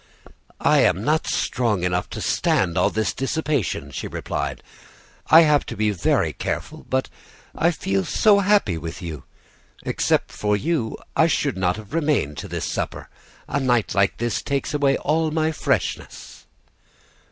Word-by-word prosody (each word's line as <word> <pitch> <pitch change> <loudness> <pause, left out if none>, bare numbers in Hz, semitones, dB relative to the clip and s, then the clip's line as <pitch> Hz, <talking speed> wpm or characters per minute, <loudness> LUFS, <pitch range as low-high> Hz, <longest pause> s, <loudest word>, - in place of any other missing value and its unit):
"'I - - +4
am 95 - +3
not 155 +5 +1
strong 110 -7 0
enough 90 0 -1
to - - -6
stand 85 -3 +1
all - - +3
this 110 0 -1
dissipation,' 140 - -2
she - - -5
replied. - - -4 0.7
'I 160 - +9
have 150 -3 +4
to - - -6
be 105 0 +2
very 90 -5 +1
careful; - - -5
but 130 0 0 0.5
I 170 - +2
feel 100 - -1
so 205 - +4
happy 195 - +2
with 85 +4 -7
you! 80 -5 -7 0.6
Except - - 0
for 105 -1 0
you, 145 -3 -1 0.2
I 160 - +5
should 145 -4 0
not 90 -1 +1
have 110 0 -11
remained 145 - 0
to - - -6
this - - -4
supper; - - -4 0.4
a 140 - -1
night 125 -5 +1
like 100 0 +2
this 120 -1 -1
takes 140 +1 -2
away 140 -2 +2
all 160 +1 0
my 160 0 0
freshness. 140 -9 -3
125 Hz, 155 wpm, -23 LUFS, 95-155 Hz, 0.7 s, I